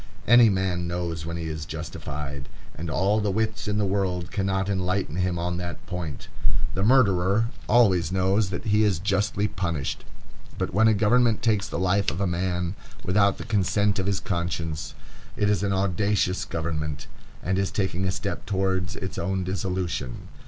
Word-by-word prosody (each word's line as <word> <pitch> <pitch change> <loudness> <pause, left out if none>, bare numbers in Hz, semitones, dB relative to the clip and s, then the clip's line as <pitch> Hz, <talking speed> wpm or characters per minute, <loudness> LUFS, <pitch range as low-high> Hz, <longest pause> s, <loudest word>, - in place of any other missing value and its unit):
Any 120 0 +8
man 95 -3 0
knows 85 -2 -3
when 85 0 -3
he 85 - -4
is 80 -1 -4
justified, 75 -3 -6 0.2
and 85 +1 -5
all 100 +6 +2
the 105 - 0
wits 110 +3 -1
in 105 0 0
the 105 - +2
world 95 -3 -1
cannot 95 -1 0
enlighten 95 -4 -1
him 90 -1 0
on 85 +1 -1
that 85 -3 -6
point. 85 -6 -5 0.5
The 95 - -1
murderer 105 -2 +4 0.2
always 95 -9 +4
knows 95 +2 +2
that 95 - -5
he 105 0 +3
is 100 -5 +2
justly 100 +3 0
punished; 85 -7 -3 0.5
but - - -2
when 110 +4 +5
a 110 - +4
government 115 +2 +3
takes 105 -4 +2
the - - -4
life 95 +3 +2
of 85 - -4
a 100 - +1
man 90 0 -1 0.3
without 100 +1 +3
the - - -7
consent 105 -1 +1
of 95 - -1
his 100 -1 +1
conscience, 85 -6 -3 0.4
it 105 0 +2
is 100 - +1
an 100 -1 0
audacious 95 0 +1
government, 75 -4 -3 0.4
and 95 +1 0
is 95 - +1
taking 95 -2 -1
a 95 - +1
step - - -4
towards 95 -2 0
its 95 - -5
own 95 -1 -1
dissolution. 90 -7 -3
95 Hz, 175 wpm, -25 LUFS, 85-100 Hz, 0.5 s, Any